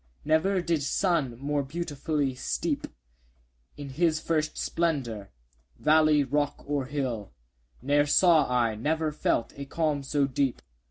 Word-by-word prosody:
Never 175 +5 +2
did 165 -3 0
sun 145 -4 0
more 145 +2 -1
beautifully 145 -1 -2
steep 125 - -2 0.9
In 145 -1 -7
his 155 +3 +1
first 155 -1 -1
splendour 130 -12 -2 0.5
valley, 155 -1 +4
rock, 145 +2 -1
or 140 -2 -2
hill; 130 -8 -3 0.5
10 130 - -14
Ne'er 145 +1 +4
saw 165 -3 +4
I, 120 -3 +2
never 155 +8 -1
felt, 150 -5 -1
a 140 - -6
calm 150 0 -1
so 140 +1 +1
deep! 135 -1 -1
145 Hz, 130 wpm, -27 LUFS, 135-155 Hz, 0.9 s, valley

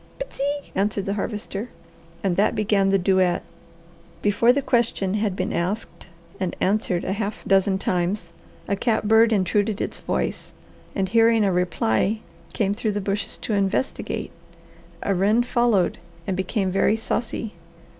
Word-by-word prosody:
"Pt'see!" 290 - -3
answer 205 +2 0
the 195 0 -2
Harvester. 210 +1 -4 0.5
That 195 +1 +2
began 205 -2 +2
the 195 - +4
duet. 185 -1 +2 0.8
Before 210 +4 +4
the 280 +2 0
question 235 -7 +1
had 210 -2 0
been - - -2
asked 190 +6 -3 0.3
and 185 -2 -2
answered 190 -3 +1
a 190 - 0
half 205 0 -4
dozen 195 0 +3
times 185 +2 -1 0.3
a 200 - +1
catbird 220 +1 +3
intruded 205 +1 +1
its - - -3
voice - - -2 0.4
and 190 -1 0
hearing 225 +1 +4
a 195 - +2
reply 180 - +1 0.3
came 200 -2 0
through 215 0 -1
the 205 - -1
bushes 200 +1 -3
to 225 - -1
investigate. 200 +6 -1 0.7
A 200 - +1
wren 205 +6 +3
followed 235 -8 +2 0.3
and 190 - -1
became 190 +1 -1
very 195 +3 +2
saucy. 225 -1 -3
205 Hz, 140 wpm, -23 LUFS, 190-225 Hz, 0.8 s, the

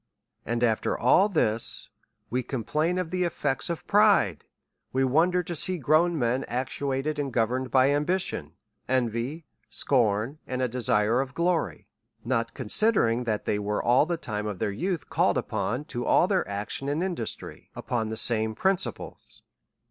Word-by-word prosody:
And 120 +1 -1
after 110 -2 +1
all 185 - +4
this, 115 - +1 0.4
we 125 +2 0
complain 150 +8 -1
of 180 -2 -3
the 185 0 0
effects 145 -5 -1
of 170 - -4
pride; 200 - +3 0.5
we 135 +1 +1
wonder 170 +7 +2
to 175 +1 -5
see 185 +4 +1
grown 160 +4 +2
men 125 0 0
actuated 135 +4 -2
and 140 -2 -2
go 115 -1 +2
verned 130 +2 -3
by 130 +2 +4
ambition, 145 - -1 0.4
envy, 130 +5 -1 0.2
scorn, 120 +2 +1
and 130 - -3
a 130 - +1
desire 115 -1 +1
of 135 0 -6
g 170 - -1
lory; 165 - -1 0.4
not 115 -2 -1
considering 125 - +2
that 110 -2 -2
they 105 - 0
were 105 0 -2
all 125 +5 +4
the 170 -1 -1
time 105 -9 -4
of 105 -3 -4
their 100 - -1
youth, 175 - -3
called - - +1
upon 110 +7 -2
to 120 -6 -5
all 175 - +3
their 190 -2 0
action 105 +7 -3
and 150 +4 -1
industry 175 -12 -5
upon 115 -3 -2
the 110 - -4
same 110 -1 +2
principles. 190 - -3
130 Hz, 165 wpm, -26 LUFS, 115-165 Hz, 0.5 s, all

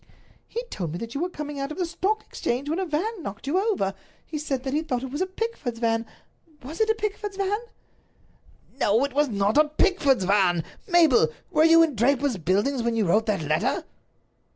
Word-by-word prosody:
"He 475 - -4
told 170 -6 -4
me - - -3
that 230 +4 -6
you 280 - -3
were 355 - 0
coming 295 -4 -6
out 275 +2 -3
of 305 - -6
the 365 - 0
Stock 390 +6 -1
Exchange 250 +4 -3
when 320 +4 -1
a 380 - -1
van 365 +7 -2
knocked 200 -5 -7
you 310 +7 +1
over. 390 - 0 0.3
He 305 - -5
said 270 -4 -2
that 265 -1 -3
he 305 - +1
thought 255 -6 -2
it 265 - -5
was 290 +5 -3
a 375 - +1
Pickford's 375 - -4
van—was 245 - -5
it 440 - +3
a 440 - +3
Pickford's 415 -2 -4
van?" 400 +1 0 1.2
"No, 220 +3 +3
it 280 - -6
was 295 0 +2
not 205 +4 +2
a 305 - +6
Pickford's 295 - +2
van. 185 -3 +3 0.2
Mabel, 325 - +5 0.2
were 315 -2 +4
you 330 0 +7
in 320 -3 +1
Draper's 260 +1 +2
Buildings 205 - +1
when 235 0 0
you 220 -2 +1
wrote 215 +6 +2
that 200 -6 0
letter?" 155 +1 0
285 Hz, 205 wpm, -25 LUFS, 225-350 Hz, 1.2 s, you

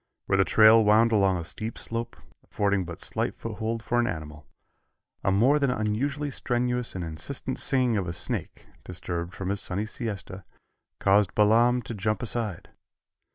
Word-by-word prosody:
Where 95 - +1
the - - +6
trail 110 +3 +6
wound 110 +2 +4
along 100 -4 +3
a 85 - -5
steep 110 +7 -5
slope, 115 +1 -4 0.3
affording 100 -2 0
but 85 -1 -8
slight - - -1
foothold 115 +1 -4
for 120 +2 0
an 120 - +2
animal, 75 -2 -6 0.8
a 95 - +2
more 125 +10 +4
than 140 -2 +1
unusually 130 +6 -1
strenuous 125 -2 -1
and 90 - -3
insistent 80 -2 -3
singing 125 -4 +2
of 95 -3 -2
a 85 - -3
snake, - - -3 0.2
disturbed 85 -1 -5
from 95 -1 -4
his 100 0 +1
sunny 100 +4 -1
siesta, 100 -4 -5 0.5
caused 100 -1 +2
Balaam 120 +4 +4
to - - -6
jump 105 +1 -2
aside. 110 -6 -4
105 Hz, 160 wpm, -26 LUFS, 95-120 Hz, 0.8 s, the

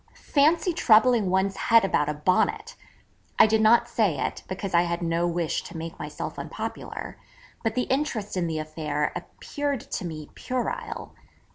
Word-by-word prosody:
Fancy 325 +5 +2
troubling 230 - +4
one's 190 +1 +1
head 230 +1 +4
about 150 -6 +1
a 150 - -2
Bonnet! 220 - 0 0.6
I - - +8
did 220 0 +2
not 220 +2 +5
say 200 -10 +1
it, - - -2
because 190 0 -5
I 170 - +6
had 170 0 -2
no 170 +1 +1
wish 170 -2 -1
to - - -8
make 165 0 -7
myself 150 0 -6
unpopular, - - -6 0.4
but 225 -1 -1
the 250 - +1
interest 260 -8 -2
in 175 -2 0
the 160 -1 -2
affair 155 -1 -2
appeared 280 +9 -4
to - - -3
me 155 -3 -7
puerile. 435 - -4
195 Hz, 160 wpm, -26 LUFS, 165-250 Hz, 0.6 s, I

